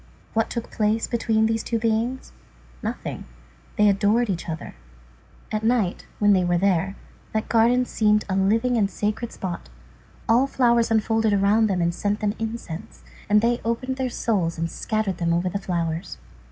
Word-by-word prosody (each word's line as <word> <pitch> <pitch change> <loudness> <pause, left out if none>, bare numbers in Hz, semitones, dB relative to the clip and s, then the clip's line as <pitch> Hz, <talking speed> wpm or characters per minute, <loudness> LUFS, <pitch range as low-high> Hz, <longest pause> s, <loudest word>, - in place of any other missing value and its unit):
What 225 0 +1
took 235 - -5
place 215 +1 +1
between 225 -2 +1
these 225 0 0
two 230 - -1
beings? 230 +3 -1 0.5
Nothing. - - -5 0.5
They 210 - +4
adored 205 +3 +3
each 175 -1 -4
other. 160 0 -5 0.8
At 215 0 -2
night, 225 -6 0
when 205 -1 +4
they 185 -2 +3
were 175 0 +2
there, 195 +1 +1 0.4
that 220 0 -1
garden 240 +2 +4
seemed 210 -3 +2
a 190 - -1
living 225 +6 +2
and 200 -3 +2
a - - -17
sacred 215 +3 -2
spot. 175 - -6 0.6
All 245 +4 +4
flowers 235 -3 +2
unfolded 225 -1 +2
around 205 +3 +3
them 185 -4 0
and 170 0 +1
sent 205 +4 -1
them 205 -1 0
incense; 225 -7 -6 0.3
and 210 0 +5
they 240 +1 +1
opened 255 +3 -2
their 260 -1 -1
souls 190 -9 -1
and 165 0 -2
scattered 215 -4 -2
them 170 -1 +1
over 175 +2 0
the 200 - -3
flowers. 170 -2 -3
215 Hz, 170 wpm, -24 LUFS, 195-230 Hz, 0.8 s, and